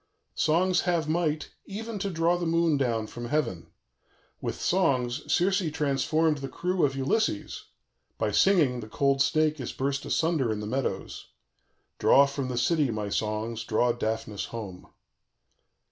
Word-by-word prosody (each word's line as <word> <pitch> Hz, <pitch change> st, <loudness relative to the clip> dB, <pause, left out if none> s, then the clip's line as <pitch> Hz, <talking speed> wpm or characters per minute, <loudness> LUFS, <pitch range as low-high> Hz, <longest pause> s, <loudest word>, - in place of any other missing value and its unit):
_ -, -, -44 dB, 0.3 s
"Songs 175 Hz, +4 st, +2 dB
have 165 Hz, -3 st, +1 dB
might, 155 Hz, -1 st, -1 dB, 0.2 s
even, 220 Hz, +1 st, -5 dB
to 200 Hz, -, -2 dB
draw 170 Hz, 0 st, +2 dB
down -, -, -3 dB
the 175 Hz, -, -2 dB, 0.4 s
moon 115 Hz, -2 st, -1 dB
from 120 Hz, +2 st, -7 dB
heaven; 120 Hz, -, -1 dB, 0.7 s
with -, -, -4 dB
songs 140 Hz, -7 st, 0 dB
Circe 190 Hz, +3 st, +3 dB
transformed 150 Hz, +1 st, +1 dB
the 135 Hz, 0 st, -5 dB
crew 180 Hz, +6 st, -1 dB
of 135 Hz, -2 st, +2 dB
Ulysses; 220 Hz, -, -1 dB, 0.5 s
by -, -, 0 dB
singing, 155 Hz, -11 st, +3 dB
the 110 Hz, -2 st, -8 dB
cold 140 Hz, +3 st, +1 dB
snake 155 Hz, +1 st, +2 dB
is 130 Hz, -, -4 dB
burst 140 Hz, +1 st, -2 dB
asunder 160 Hz, -8 st, +1 dB
in 105 Hz, -, -2 dB
the 105 Hz, -, -5 dB
meadows. 130 Hz, +5 st, -3 dB, 0.7 s
"_Draw 140 Hz, 0 st, +6 dB
from 140 Hz, -1 st, -3 dB
the 125 Hz, -1 st, -3 dB
city, 145 Hz, +3 st, +2 dB
my 105 Hz, -2 st, -3 dB
songs, 110 Hz, +2 st, -2 dB
draw 120 Hz, +3 st, +2 dB
Daphnis 110 Hz, -3 st, -3 dB
home. 100 Hz, -6 st, -8 dB
140 Hz, 150 wpm, -27 LUFS, 120-165 Hz, 0.7 s, Draw